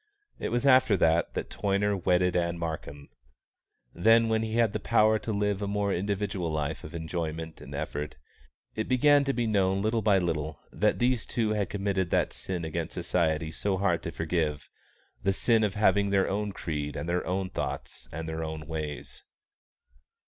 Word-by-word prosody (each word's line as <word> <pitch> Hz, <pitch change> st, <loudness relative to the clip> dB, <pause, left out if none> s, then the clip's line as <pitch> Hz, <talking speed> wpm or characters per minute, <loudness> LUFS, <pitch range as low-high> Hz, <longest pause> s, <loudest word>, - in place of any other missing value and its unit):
It -, -, -2 dB
was 120 Hz, +3 st, 0 dB
after 130 Hz, -6 st, +5 dB
that 80 Hz, 0 st, +2 dB
that -, -, -4 dB
Toyner 100 Hz, +1 st, +1 dB
wedded 90 Hz, -1 st, +2 dB
Ann 85 Hz, -1 st, 0 dB
Markham. 80 Hz, -4 st, -5 dB, 0.8 s
Then, 115 Hz, +5 st, +4 dB
when 110 Hz, 0 st, +2 dB
he 110 Hz, 0 st, -3 dB
had 115 Hz, -3 st, +3 dB
the 110 Hz, -, -1 dB
power 110 Hz, 0 st, +3 dB
to 110 Hz, -, -4 dB
live 105 Hz, -1 st, 0 dB
a 100 Hz, -, -1 dB
more 100 Hz, -1 st, 0 dB
individual 100 Hz, -2 st, -2 dB
life 75 Hz, 0 st, -2 dB
of 75 Hz, -, -8 dB
enjoyment 80 Hz, -1 st, -4 dB
and 70 Hz, +2 st, -8 dB
effort, 75 Hz, 0 st, -4 dB, 0.6 s
it 110 Hz, -, -3 dB
began 145 Hz, +3 st, +5 dB
to 135 Hz, -, +2 dB
be 120 Hz, -3 st, -1 dB
known 100 Hz, -2 st, +2 dB
little 110 Hz, +1 st, +1 dB
by 105 Hz, -2 st, +4 dB
little 80 Hz, -4 st, -2 dB
that -, -, +1 dB
these 120 Hz, -2 st, +1 dB
two 110 Hz, -3 st, 0 dB
had 105 Hz, -3 st, 0 dB
committed 100 Hz, -3 st, -1 dB
that -, -, +1 dB
sin 90 Hz, -3 st, -4 dB
against 80 Hz, +1 st, -4 dB
society 80 Hz, -3 st, 0 dB
so 95 Hz, +4 st, -1 dB
hard 90 Hz, -3 st, +1 dB
to 85 Hz, -, -5 dB
forgive, 80 Hz, -3 st, -1 dB, 0.5 s
the 95 Hz, -, +2 dB
sin 115 Hz, +2 st, +3 dB
of 105 Hz, -1 st, 0 dB
having 100 Hz, -1 st, +3 dB
their 100 Hz, -1 st, +2 dB
own 105 Hz, +1 st, -1 dB
creed 75 Hz, -5 st, -4 dB
and 85 Hz, -, -4 dB
their 90 Hz, +1 st, 0 dB
own 95 Hz, 0 st, -1 dB
thoughts -, -, -5 dB
and 80 Hz, +1 st, -5 dB
their 80 Hz, 0 st, -3 dB
own 80 Hz, -1 st, -5 dB
ways. 75 Hz, -2 st, -5 dB
95 Hz, 180 wpm, -28 LUFS, 80-105 Hz, 0.8 s, after